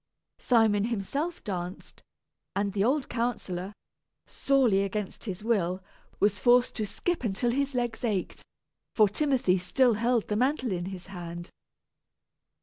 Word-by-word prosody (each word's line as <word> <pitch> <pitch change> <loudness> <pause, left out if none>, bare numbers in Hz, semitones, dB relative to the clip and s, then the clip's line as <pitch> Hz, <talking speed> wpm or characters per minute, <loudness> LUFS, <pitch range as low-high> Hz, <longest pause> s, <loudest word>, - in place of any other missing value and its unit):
Simon 220 -4 +3
himself 260 - -3
danced, 180 -3 -6 0.5
and 200 0 0
the 200 -1 +1
old 265 +4 +1
counsellor, 205 -6 -2 0.5
sorely 250 -8 +2
against 200 +2 -4
his 195 -2 -5
will, 190 -5 0 0.4
was 205 0 +2
forced 245 0 +4
to 215 -2 -1
skip 340 - -2
until 230 +2 0
his 275 +1 -1
legs 240 -2 -2
ached, 210 -6 -2 0.5
for 215 -2 +6
Timothy 240 -5 +1
still 240 +7 +3
held 235 +1 +1
the 210 - -1
mantle 255 +1 +1
in 175 -1 -2
his 185 -1 -7
hand. 175 -2 -7
215 Hz, 135 wpm, -28 LUFS, 190-245 Hz, 0.5 s, for